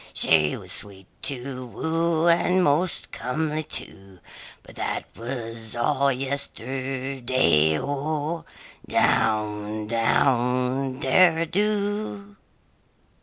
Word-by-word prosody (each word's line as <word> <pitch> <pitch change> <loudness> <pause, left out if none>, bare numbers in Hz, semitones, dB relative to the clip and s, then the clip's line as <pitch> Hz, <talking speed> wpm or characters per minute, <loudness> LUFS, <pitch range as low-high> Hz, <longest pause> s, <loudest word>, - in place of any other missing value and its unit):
She 75 -2 +3
was - - -7
sweet 100 -2 -1 0.2
to 130 -1 -2
woo 165 +5 0
and 175 +2 +3
most 165 +4 +1
comely, 155 +4 -2
too, 95 -10 -7 0.5
But - - -14
that - - -3
was 115 -2 -5
all 130 +4 +2
yesterday 130 - 0
O! 150 +4 -3 0.4
Down, 105 -1 +1
down, 125 +3 +1
derry 165 +4 +4
do! 205 +2 -2
135 Hz, 85 wpm, -24 LUFS, 115-160 Hz, 0.5 s, derry